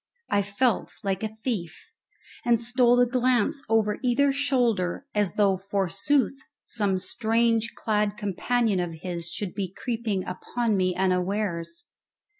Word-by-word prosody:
I 205 Hz, -, +3 dB
felt 205 Hz, +3 st, 0 dB
like 195 Hz, -1 st, -1 dB
a 220 Hz, -, 0 dB
thief, 220 Hz, -7 st, -4 dB, 0.6 s
and 235 Hz, -1 st, +3 dB
stole 245 Hz, +1 st, +3 dB
a 245 Hz, -, +6 dB
glance 255 Hz, +2 st, +1 dB
over 215 Hz, -2 st, +2 dB
either 275 Hz, +3 st, +3 dB
shoulder 245 Hz, -7 st, +1 dB
as 205 Hz, -4 st, +1 dB
though, 200 Hz, -2 st, +3 dB
forsooth, 200 Hz, +9 st, 0 dB, 0.2 s
some 205 Hz, -4 st, 0 dB
strangely 230 Hz, +2 st, +1 dB
clad 210 Hz, -2 st, 0 dB
companion 210 Hz, +1 st, 0 dB
of 175 Hz, -2 st, -3 dB
his 175 Hz, -2 st, -4 dB
should 200 Hz, 0 st, -4 dB
be 190 Hz, -3 st, -3 dB
creeping 225 Hz, -3 st, -2 dB
upon 225 Hz, +4 st, -2 dB
me 185 Hz, -2 st, +1 dB
unawares. 180 Hz, -2 st, -1 dB
210 Hz, 130 wpm, -26 LUFS, 190-240 Hz, 0.6 s, a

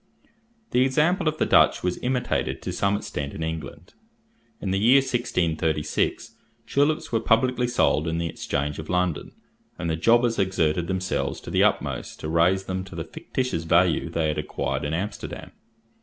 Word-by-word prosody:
The 125 Hz, -, +4 dB
example 150 Hz, +7 st, +2 dB
of 155 Hz, 0 st, 0 dB
the -, -, +1 dB
Dutch -, -, +4 dB
was 90 Hz, 0 st, -1 dB
imitated 125 Hz, 0 st, -1 dB
to -, -, -3 dB
some 100 Hz, +1 st, +1 dB
extent 70 Hz, -8 st, -5 dB
in 80 Hz, -, -4 dB
England. 80 Hz, 0 st, -6 dB, 0.7 s
In 95 Hz, -, -3 dB
the 95 Hz, -, +1 dB
year 120 Hz, +6 st, +6 dB
1636 85 Hz, -, 0 dB, 0.3 s
tulips 145 Hz, +2 st, +1 dB
were 115 Hz, -, +2 dB
publicly 125 Hz, +2 st, +2 dB
sold 85 Hz, -9 st, +2 dB
in 80 Hz, 0 st, -1 dB
the 85 Hz, -, -1 dB
Exchange 75 Hz, -2 st, -3 dB
of 80 Hz, -, -8 dB
London, 90 Hz, -3 st, -1 dB, 0.4 s
and 85 Hz, -, -2 dB
the -, -, 0 dB
jobbers 115 Hz, +6 st, +3 dB
exerted 85 Hz, -3 st, +1 dB
themselves 95 Hz, 0 st, -2 dB
to -, -, -8 dB
the -, -, +2 dB
utmost -, -, -1 dB
to 75 Hz, -, -4 dB
raise 85 Hz, +4 st, +3 dB
them 95 Hz, 0 st, -3 dB
to 95 Hz, -, -11 dB
the -, -, -3 dB
fictitious 125 Hz, -11 st, -3 dB
value -, -, +3 dB
they 80 Hz, -2 st, 0 dB
had 75 Hz, -, -1 dB
acquired 70 Hz, -2 st, -3 dB
in 75 Hz, +2 st, -1 dB
Amsterdam. 100 Hz, +4 st, -5 dB
95 Hz, 170 wpm, -25 LUFS, 80-120 Hz, 0.7 s, year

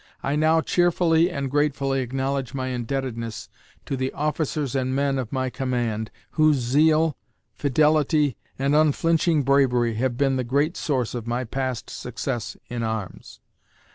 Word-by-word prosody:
I 140 Hz, -, 0 dB
now 160 Hz, +2 st, +3 dB
cheerfully 170 Hz, -1 st, +3 dB
and 140 Hz, -4 st, -3 dB
gratefully 140 Hz, -2 st, +1 dB
acknowledge 135 Hz, +1 st, -2 dB
my 130 Hz, -1 st, -2 dB
indebtedness 120 Hz, -2 st, -4 dB, 0.4 s
to 135 Hz, -, -2 dB
the 130 Hz, 0 st, -2 dB
officers 150 Hz, -2 st, -1 dB
and 130 Hz, 0 st, 0 dB
men 140 Hz, -1 st, +1 dB
of 120 Hz, -4 st, -4 dB
my 130 Hz, -1 st, -1 dB
command, 120 Hz, -3 st, -2 dB, 0.2 s
whose 155 Hz, -1 st, +4 dB
zeal, 155 Hz, +5 st, +3 dB, 0.4 s
fidelity, 150 Hz, -1 st, +2 dB, 0.2 s
and 140 Hz, +2 st, +1 dB
unflinching 155 Hz, +1 st, +3 dB
bravery 125 Hz, -4 st, +3 dB
have 120 Hz, 0 st, 0 dB
been 135 Hz, -1 st, +2 dB
the 130 Hz, -, 0 dB
great 145 Hz, +7 st, +1 dB
source 130 Hz, -6 st, -1 dB
of 120 Hz, -2 st, -5 dB
my 120 Hz, +2 st, -1 dB
past 130 Hz, 0 st, -3 dB
success 120 Hz, -1 st, -4 dB
in 120 Hz, -1 st, -4 dB
arms. 110 Hz, -4 st, -5 dB
135 Hz, 140 wpm, -24 LUFS, 125-150 Hz, 0.4 s, whose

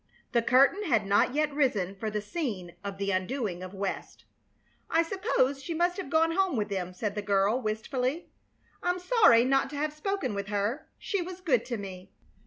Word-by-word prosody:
The 235 Hz, -, +3 dB
curtain 275 Hz, -, +4 dB
had 230 Hz, -, +2 dB
not 205 Hz, +6 st, +3 dB
yet 300 Hz, -1 st, +1 dB
risen 225 Hz, -10 st, +1 dB
for 215 Hz, +2 st, -3 dB
the 210 Hz, 0 st, -2 dB
scene 205 Hz, -, -4 dB
of 200 Hz, -1 st, -5 dB
the 200 Hz, 0 st, -1 dB
undoing 185 Hz, -1 st, -2 dB
of 185 Hz, +1 st, -8 dB
West. 195 Hz, 0 st, -5 dB, 0.6 s
"I 330 Hz, +1 st, +3 dB
suppose 330 Hz, -, 0 dB
she 325 Hz, +4 st, -4 dB
must 350 Hz, +3 st, +1 dB
have 380 Hz, -8 st, -5 dB
gone 325 Hz, +2 st, +3 dB
home 380 Hz, -2 st, +1 dB
with 210 Hz, -1 st, -1 dB
them," 185 Hz, -3 st, -3 dB
said 200 Hz, +3 st, -3 dB
the 210 Hz, -, -3 dB
girl, 200 Hz, +4 st, +2 dB
wistfully. 250 Hz, +7 st, -2 dB, 0.5 s
"I'm 355 Hz, 0 st, 0 dB
sorry 360 Hz, -, +5 dB
not 270 Hz, +1 st, +2 dB
to 295 Hz, -, -8 dB
have 300 Hz, +1 st, -1 dB
spoken 390 Hz, -, -2 dB
with 200 Hz, -1 st, -4 dB
her. 210 Hz, +7 st, -2 dB
She 400 Hz, -3 st, -2 dB
was 360 Hz, +1 st, -6 dB
good 280 Hz, -, +1 dB
to 240 Hz, -, -3 dB
me." 190 Hz, -2 st, -8 dB
250 Hz, 195 wpm, -29 LUFS, 200-325 Hz, 0.6 s, sorry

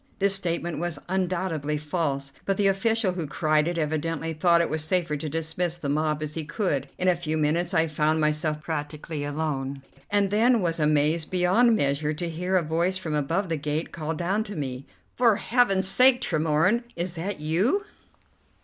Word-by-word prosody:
This 200 Hz, -1 st, +3 dB
statement 175 Hz, -3 st, -2 dB
was 175 Hz, -2 st, -3 dB
undoubtedly 180 Hz, -5 st, -1 dB
false, 145 Hz, -3 st, -2 dB
but 195 Hz, -1 st, +1 dB
the 205 Hz, -, +2 dB
official 195 Hz, +1 st, +2 dB
who 175 Hz, -4 st, -4 dB
cried 155 Hz, +1 st, +1 dB
it 175 Hz, 0 st, -2 dB
evidently 160 Hz, +1 st, -2 dB
thought 170 Hz, +2 st, +3 dB
it 170 Hz, -, +2 dB
was 155 Hz, -1 st, -2 dB
safer 170 Hz, -1 st, 0 dB
to 150 Hz, +1 st, -4 dB
dismiss 165 Hz, +2 st, -2 dB
the 145 Hz, -5 st, -4 dB
mob 155 Hz, +1 st, 0 dB
as 150 Hz, 0 st, -4 dB
he 160 Hz, -, -3 dB
could. 150 Hz, -, -2 dB
In 185 Hz, -, -1 dB
a 180 Hz, -, +5 dB
few 160 Hz, -2 st, -3 dB
minutes 160 Hz, +3 st, +1 dB
I 165 Hz, -2 st, +3 dB
found 155 Hz, 0 st, +1 dB
myself 150 Hz, 0 st, 0 dB
practically 150 Hz, 0 st, -4 dB
alone, 140 Hz, -2 st, -3 dB, 0.3 s
and 200 Hz, -1 st, +2 dB
then 235 Hz, +3 st, +4 dB
was 170 Hz, -4 st, -1 dB
amazed 150 Hz, +1 st, +2 dB
beyond 185 Hz, +6 st, +3 dB
measure 145 Hz, -2 st, 0 dB
to 170 Hz, +3 st, -4 dB
hear 180 Hz, +3 st, -2 dB
a 180 Hz, -, +3 dB
voice 170 Hz, +4 st, 0 dB
from 165 Hz, -4 st, -4 dB
above 165 Hz, +7 st, 0 dB
the 165 Hz, -1 st, -1 dB
gate 150 Hz, +2 st, -3 dB
call 160 Hz, 0 st, -4 dB
down 190 Hz, +6 st, 0 dB
to 205 Hz, -, -7 dB
me: 135 Hz, -3 st, -5 dB, 0.3 s
"For 235 Hz, -4 st, +5 dB
Heaven's 200 Hz, -5 st, +2 dB
sake, 250 Hz, +5 st, +5 dB
Tremorne, 165 Hz, +6 st, +1 dB
is 175 Hz, +1 st, -2 dB
that 180 Hz, +2 st, -4 dB
you?" 185 Hz, -, +1 dB
165 Hz, 185 wpm, -26 LUFS, 150-185 Hz, 0.3 s, a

